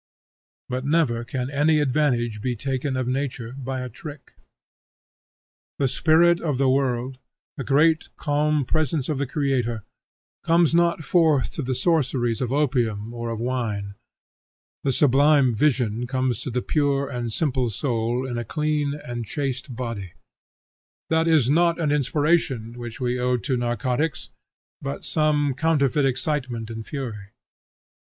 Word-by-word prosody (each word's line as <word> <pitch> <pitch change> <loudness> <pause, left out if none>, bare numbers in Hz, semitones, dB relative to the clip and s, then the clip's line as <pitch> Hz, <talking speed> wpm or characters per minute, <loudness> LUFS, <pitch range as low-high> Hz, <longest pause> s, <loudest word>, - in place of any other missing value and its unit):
But 125 0 -3
never 140 -6 +1
can 125 +2 -4
any 150 +2 +3
advantage 125 -6 +1
be 125 +1 -1
taken 130 +2 -2
of 130 -1 -1
nature 130 -3 -2
by 135 -1 -4
a 125 - -4
trick. 145 +4 -10 1.4
The 140 - +2
spirit 170 +5 +4
of 150 -6 -1
the 135 0 +2
world, 130 -1 0 0.4
the 135 - -4
great 155 +4 +3
calm 150 -1 +1
presence 155 -1 0
of 150 -3 -1
the 140 - -1
Creator, 125 -6 -1 0.6
comes 165 -1 +3
not 170 -1 +2
forth 160 -5 +2
to - - -3
the 130 -1 -2
sorceries 130 - +1
of 125 -1 -1
opium 120 -6 0
or 120 0 -4
of 115 -1 -4
wine. 115 -5 -2 0.9
The 135 - +2
sublime 140 0 +4
vision 120 -2 +1
comes 130 -2 -1
to - - -4
the 125 0 -2
pure 140 -2 +1
and 120 -4 -4
simple 130 -2 0
soul 120 +2 -1
in 120 -2 -3
a - - -3
clean 150 +2 -1
and 120 -1 -4
chaste 130 +1 -4
body. 115 -7 -5 1.0
That 160 0 +3
is 155 -7 +4
not 170 +4 +3
an 155 -3 +1
inspiration, 145 -4 +1
which 120 -2 -7
we 125 -1 -1
owe 125 0 +1
to 130 +2 -2
narcotics, 125 +6 -1 0.5
but 140 0 -5
some 150 -3 +1
counterfeit 145 -1 +2
excitement 130 -4 -2
and 110 0 -6
fury. 110 -7 -6
130 Hz, 145 wpm, -24 LUFS, 120-150 Hz, 1.4 s, spirit